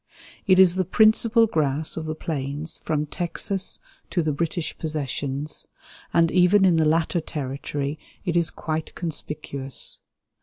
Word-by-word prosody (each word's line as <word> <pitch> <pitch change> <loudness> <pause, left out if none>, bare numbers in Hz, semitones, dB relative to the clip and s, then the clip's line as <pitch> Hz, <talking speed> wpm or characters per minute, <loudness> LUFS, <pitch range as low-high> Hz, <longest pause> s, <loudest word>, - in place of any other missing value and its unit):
It 185 -1 +6
is 185 -2 +7
the 185 - +3
principal 220 +4 +4
grass 155 -5 0
of 160 - -4
the 155 0 -3
plains 150 0 -4
from 150 -1 -1
Texas 185 +4 -2 0.3
to 175 - +1
the 155 - +1
British 165 +2 -2
Possessions, 145 -1 -3 0.4
and 165 -1 +4
even 185 +2 +5
in 175 -3 +4
the 160 - +3
latter 165 +2 +2
territory 140 0 -4 0.3
it 175 -3 0
is 170 -1 +3
quite 155 0 -4
conspicuous. 145 -4 -4
160 Hz, 140 wpm, -24 LUFS, 150-175 Hz, 0.4 s, is